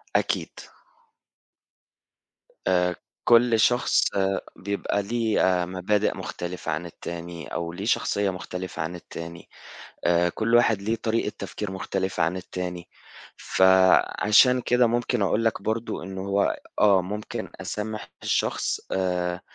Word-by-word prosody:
أكيد. - - +1 2.2
آآ 90 -1 +2 0.3
كل 120 -1 +5
شخص 120 +3 +3 0.5
بيبقى 100 +1 -2
ليه 115 +1 0 0.2
آآ - - -1
مبادئ 95 +3 0
مختلِفة 90 -2 -5
عن 80 +3 -3
التاني 85 -2 -7
أو 85 0 -3
ليه 100 +4 -5
شخصيّة 100 -3 +1
مختلِفة 90 -1 -5
عن 85 +3 -3
التاني 85 0 -9 0.6
آآ، 85 0 +3
كل 115 +6 -1
واحد 110 -4 +4
ليه 110 +3 0
طريقة 110 -2 -1
تفكير 100 +1 -5
مختلِفة 95 -2 -2
عن 85 +3 +1
التاني 90 -1 -5 0.5
فعشان 95 +6 +4
كده 125 0 +3
ممكن 120 -1 0
أقول 105 +4 +1
لك 115 - 0
برضه 110 -3 -2
إن 95 +1 -7
هو 100 +1 +1 0.2
آه، 100 -3 +5
ممكن 105 +3 -5
أسامح 110 +1 -4
الشخص - - 0
آآ 90 -1 -1
95 Hz, 120 wpm, -25 LUFS, 90-110 Hz, 2.2 s, كل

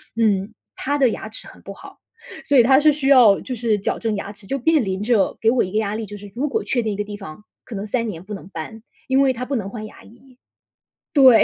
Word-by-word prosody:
嗯， 215 -2 +1 0.2
她 285 +2 -1
的 265 -4 +4
牙 220 - -5
齿 220 - -8
很 - - -15
不 - - -8
好， - - -14 0.5
所 285 - +3
以 240 - +8
她 265 +2 +5
是 305 0 +5
需 280 -2 -2
要 235 -7 +7
就 255 - -5
是 225 -2 +1
矫 195 - -2
正 225 -2 -1
牙 200 0 -5
齿， 200 -1 -13
就 275 - -1
面 315 0 +3
临 190 -1 -3
着 225 -3 +1
给 225 - +4
我 250 - +2
一 185 - -5
个 215 - -1
压 210 -1 -2
力， 225 - -4
就 205 0 -9
是 205 -1 -11
如 280 +5 -1
果 435 +10 -1
确 245 - 0
定 215 -2 -1
一 - - -4
个 205 - -2
地 205 0 -8
方， 195 -1 -10 0.2
可 230 - -8
能 200 +1 -4
3 230 +1 -1
年 175 -5 -6
不 210 - -8
能 195 -3 -8
搬， 200 +6 -8 0.3
因 265 0 +3
为 270 -1 +3
她 250 +1 -5
不 275 - -2
能 200 -5 -3
换 215 0 -7
牙 - - -13
医。 245 +3 -19 0.8
对。 260 -6 +7
225 Hz, 290 characters per minute, -21 LUFS, 205-260 Hz, 0.8 s, 以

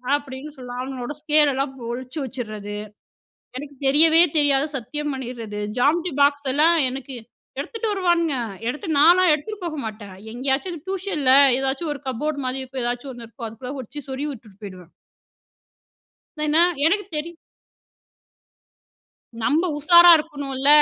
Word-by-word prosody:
அப்படின்னு 285 0 -7
சொல்லலாம். 245 -1 -7
அவனுகளோட 260 0 -5
ஸ்கேலெல்லாம் 290 -3 +2 0.2
ஒழிச்சி 255 +4 -7
வெச்சிட்றது. 215 -5 -6 0.8
"எனக்கு 285 +1 -8
தெரியவே 320 +4 +6 0.2
தெரியாது" 285 -1 +3
சத்தியம் 295 +4 -4
பண்ணிட்றது. 235 -5 -6 0.2
ஜாம்மண்றி 335 +6 +1
பாக்ஸ்லாம் 285 +3 +3
எனக்கு 265 +1 -7 0.5
எடுத்துட்டு 455 -1 -4
வருவானுங்க. 345 -5 +1 0.3
எடுத்து 300 +9 -5
நான்லாம் 350 +4 +6
எடுத்துட்டு 410 +7 -6
போக 310 -3 -4
மாட்டேன். 210 -3 -8 0.2
எங்கேயாச்சும் 275 +8 -2
டியூஷன்ல, 370 -8 0 0.3
ஏதாச்சும் 270 +4 -2
ஒரு 280 - -11
கப்போர்டு 285 +4 -2
மாரி 260 +1 -2
இருக்கும். 260 0 -6
எதாச்சும் 245 +3 -4
ஒண்ணு 235 -1 -10
இருக்கும். 230 0 -8
அதுக்குள்ள 250 +4 -8
ஒழிச்சி 285 +4 -8
சொறிகி 275 +3 -3
உட்டுட்டு 215 -6 -14
போயிடுவேன். 185 -4 -10 1.5
ஏனா, 305 +2 +3 0.3
எனக்கு 405 +4 +1
தெரியும். 330 +3 -5 2.0
நம்ப 300 +9 +1
உஷாரா 345 +3 +7
இருக்கணும்ல, 285 -3 -3
280 Hz, 120 wpm, -22 LUFS, 255-310 Hz, 2.0 s, உஷாரா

